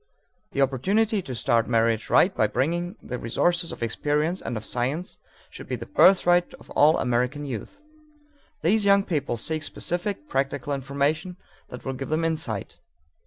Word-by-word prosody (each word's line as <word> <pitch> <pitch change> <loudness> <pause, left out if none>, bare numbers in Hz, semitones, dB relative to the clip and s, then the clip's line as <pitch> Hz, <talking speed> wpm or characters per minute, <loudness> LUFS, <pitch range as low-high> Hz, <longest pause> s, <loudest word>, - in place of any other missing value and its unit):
The 140 - +3
opportunity 195 - +1
to 130 -8 -6
start 115 0 +2
marriage 115 -1 +1
right 190 +1 +4
by 110 - +3
bringing 175 - -1
the 125 0 -5
resources 175 +9 0
of - - -6
experience 150 +9 0
and 120 - -4
of 110 - -6
science 135 +9 -2 0.3
should - - -10
be - - -2
the - - -7
birthright 180 - +4
of - - -17
all 150 +2 +5
American 125 +4 0
youth. 130 - -6 0.8
These 210 +6 +3
young 200 0 +5
people 150 -9 -2
seek 155 +7 -2
specific, 175 +1 -4
practical 140 +1 -1
information 140 +6 -1 0.3
that 125 - -9
will 135 - -2
give 135 +1 -6
them 160 +2 0
insight. 115 - -2
145 Hz, 160 wpm, -25 LUFS, 125-175 Hz, 0.8 s, all